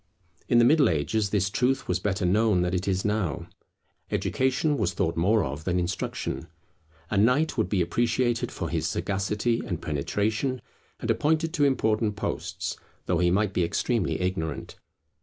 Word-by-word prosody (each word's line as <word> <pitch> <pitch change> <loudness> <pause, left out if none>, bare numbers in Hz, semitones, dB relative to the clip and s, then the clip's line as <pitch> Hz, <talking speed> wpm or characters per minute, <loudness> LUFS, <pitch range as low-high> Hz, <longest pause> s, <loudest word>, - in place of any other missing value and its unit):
In 120 - +4
the 120 - +6
Middle 150 +2 +5
Ages 100 +7 0
this 100 -2 0
truth 130 +3 +1
was 90 0 0
better 95 -1 -1
known 100 0 +3
than 90 0 -1
it 90 +1 -1
is 95 -1 0
now. 90 -6 -1 0.6
Education 130 +3 +1
was 90 -4 0
thought 80 - 0
more 100 +6 +3
of 70 +3 -5
than 90 +1 0
instruction. 85 0 -3 0.6
A 105 - +1
knight 125 +9 +3
would 110 - 0
be 95 -4 +2
appreciated 120 +5 0
for - - -4
his 80 -1 -1
sagacity 100 +7 -1
and 85 -3 -4
penetration, 105 - -1 0.4
and - - +1
appointed 160 +2 +1
to 145 -5 +3
important 110 -5 +1
posts, - - -4 0.3
though 90 -2 +1
he 90 0 +3
might 100 +2 +1
be 90 - +1
extremely 115 +7 0
ignorant. 90 -4 -3
100 Hz, 160 wpm, -26 LUFS, 90-120 Hz, 0.6 s, the